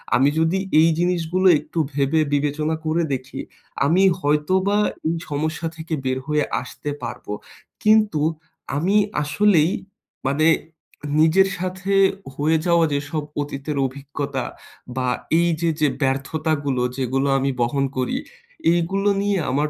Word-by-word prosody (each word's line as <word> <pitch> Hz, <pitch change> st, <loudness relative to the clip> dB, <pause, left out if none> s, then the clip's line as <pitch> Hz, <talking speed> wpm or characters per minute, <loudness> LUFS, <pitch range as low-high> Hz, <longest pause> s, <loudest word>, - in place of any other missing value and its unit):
আমি 135 Hz, +3 st, +4 dB
যদি 160 Hz, +3 st, +2 dB, 0.2 s
এই 165 Hz, -, +5 dB
জিনিসগুলো 180 Hz, +1 st, +1 dB
একটু 165 Hz, -, -5 dB
ভেবে, 140 Hz, +3 st, +1 dB
বিবেচনা 150 Hz, +2 st, 0 dB
করে 160 Hz, +2 st, +1 dB
দেখি, 130 Hz, 0 st, -5 dB, 0.5 s
আমি 175 Hz, +6 st, +4 dB, 0.2 s
হয়তোবা 185 Hz, +8 st, +2 dB, 0.3 s
এই 165 Hz, -, +1 dB
সমস্যা 155 Hz, +3 st, -2 dB
থেকে 160 Hz, 0 st, -6 dB
বের 130 Hz, 0 st, 0 dB
হয়ে 150 Hz, -1 st, +2 dB, 0.2 s
আসতে 125 Hz, +3 st, -7 dB
পারবো। 120 Hz, -3 st, -5 dB, 0.5 s
কিন্তু 215 Hz, -7 st, +4 dB, 0.6 s
আমি 180 Hz, +7 st, +1 dB, 0.3 s
আসলেই, 165 Hz, +2 st, +3 dB, 0.6 s
মানে 150 Hz, +4 st, +2 dB, 0.7 s
নিজের 165 Hz, +5 st, +5 dB
সাথে 185 Hz, +2 st, -2 dB, 0.4 s
হয়ে 155 Hz, +3 st, +2 dB
যাওয়া 170 Hz, -1 st, +4 dB
যেসব 145 Hz, +2 st, -2 dB, 0.2 s
অতীতের 145 Hz, 0 st, -4 dB
অভিজ্ঞতা 140 Hz, 0 st, -4 dB, 0.5 s
বা 130 Hz, -1 st, 0 dB, 0.3 s
এই 170 Hz, 0 st, +3 dB
যে 170 Hz, -, +2 dB
যে 150 Hz, -, +5 dB
ব্যর্থতাগুলো, 140 Hz, 0 st, 0 dB, 0.2 s
যেগুলো 135 Hz, +1 st, 0 dB
আমি 135 Hz, 0 st, 0 dB
বহন 135 Hz, +4 st, +1 dB
করি, 130 Hz, -, 0 dB, 0.6 s
এইগুলো 190 Hz, +4 st, +1 dB
নিয়ে 200 Hz, -1 st, +1 dB
আমার 145 Hz, +3 st, +1 dB
155 Hz, 125 wpm, -22 LUFS, 140-170 Hz, 0.7 s, এই